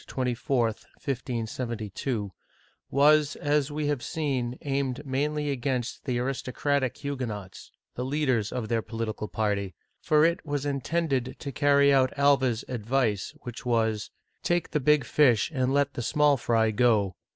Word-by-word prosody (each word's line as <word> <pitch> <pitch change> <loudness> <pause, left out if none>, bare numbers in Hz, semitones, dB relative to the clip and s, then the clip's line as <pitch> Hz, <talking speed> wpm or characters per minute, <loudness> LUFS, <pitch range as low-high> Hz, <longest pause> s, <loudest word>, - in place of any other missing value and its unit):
24, 125 -1 0
1572) 115 -2 -4 0.6
was, 150 +2 +4
as 145 -2 +1
we 150 0 -2
have 145 -3 0
seen, 130 -7 -2
aimed 140 0 -2
mainly 145 +2 -1
against 125 -2 -2
the 125 -4 -1
aristocratic 130 +1 -1
Huguenots, 120 -9 -5
— - - -63
the 125 - -3
leaders 130 -6 0
of 120 -3 -3
their 115 0 0
political 110 -2 -4
party, 100 -4 -1
— - - -48
for 155 0 +4
it 170 +1 +1
was 145 -2 -3
intended 140 -1 -1
to 140 - -6
carry 140 +1 +4
out 130 -1 +4
Alva's 135 -5 +3
advice, 115 -3 -1
which 120 -2 -8
was: 110 -3 0 0.3
Take 175 -1 0
the 150 - +1
big 150 0 +3
fish 130 -4 +3
and 130 -2 +1
let 140 0 +2
the - - -4
small 150 +3 +3
fry 115 -3 +1
go. 105 -5 +2
130 Hz, 145 wpm, -27 LUFS, 115-145 Hz, 0.6 s, was